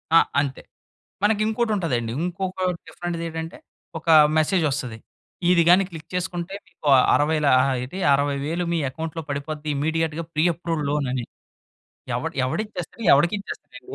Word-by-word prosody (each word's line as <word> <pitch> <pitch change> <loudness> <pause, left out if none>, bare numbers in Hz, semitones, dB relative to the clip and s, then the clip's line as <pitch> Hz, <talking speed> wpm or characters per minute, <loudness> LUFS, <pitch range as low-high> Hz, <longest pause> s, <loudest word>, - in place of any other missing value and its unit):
ఆ! - - +10 0.2
అంతే 135 -2 -4 0.6
మనకి 210 0 +3
ఇంకోటుంటదండి. 190 - 0
ఇంకొక 185 +1 -3 0.3
డిఫరెంట్‌ది 175 -1 -5
ఏటంటే, 165 0 -6 0.4
ఒక 160 - -11 0.3
మెసేజొస్తది. 150 - 0 0.5
ఇది 175 -2 +5
గానీ 180 +3 +7
క్లిక్ 160 -2 -10
చేసుకుంటే 180 0 -3
మీకు 170 -4 -9 0.3
అరవై‌ల 150 0 +1 0.4
ఎటి 180 +10 -7
60,000 145 +4 0
మీ 170 - +1
అకౌంట్‌లో 160 +4 -5
పడిపోద్ది 150 +2 -4
ఇమ్మీడియేట్‌గా 160 +2 -1
ప్రీ 155 - +1
అప్రూవల్ 165 -3 -3
లోన్ 145 -1 0
అని. 125 -3 -2 0.9
ఎవడు - - -3
ఎవడిచ్చేస్తాడు, 215 - -4
ఎవడికిచ్చేస్తాడండి. 200 - -2
165 Hz, 120 wpm, -23 LUFS, 145-180 Hz, 0.9 s, ఆ